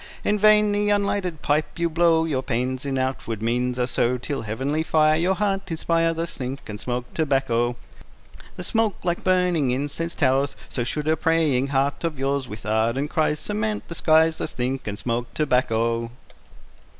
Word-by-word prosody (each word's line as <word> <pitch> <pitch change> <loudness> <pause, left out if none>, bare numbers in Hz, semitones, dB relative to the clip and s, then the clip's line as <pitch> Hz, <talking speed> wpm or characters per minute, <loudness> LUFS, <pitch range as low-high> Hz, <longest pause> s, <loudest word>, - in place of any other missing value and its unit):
In 210 - +1
vain 210 0 +5
the 205 0 +1
unlighted 200 -5 0
pipe 150 +4 0
you 170 0 +1
blow, 165 0 +3
Your 140 -5 -1
pains 130 +2 -2
in 135 -1 -1
outward 130 -4 -2
means 125 +2 0
are 125 - +1
so, 125 0 +1
Till 135 +2 -4
heavenly 130 +8 -2
fire 155 -1 +3
Your 175 +4 +1
heart 195 0 -1
inspire. 165 0 +1
Thus 165 0 -4
think, 130 +1 -5
and 105 -1 -7
smoke 125 0 -4
tobacco. 135 -6 +1 0.8
The 180 - -6
smoke, 220 +1 +1
like 175 -1 -1
burning 180 -6 +2
incense, 145 +6 -2
towers, 135 +2 +1
So 125 - -1
should 150 +5 -3
a 160 - +3
praying 155 -6 +2
heart 140 +2 0
of 165 -3 -2
yours, 135 0 -1
With 105 +1 -9
ardent 115 +7 0
cries, 155 -1 +1
Surmount 210 0 -2
the - - -4
skies. 160 0 +3
Thus - - -3
think, 130 +1 -3
and 100 -1 -3
smoke 120 +1 -3
tobacco. 115 -5 +1
145 Hz, 175 wpm, -24 LUFS, 125-170 Hz, 0.8 s, vain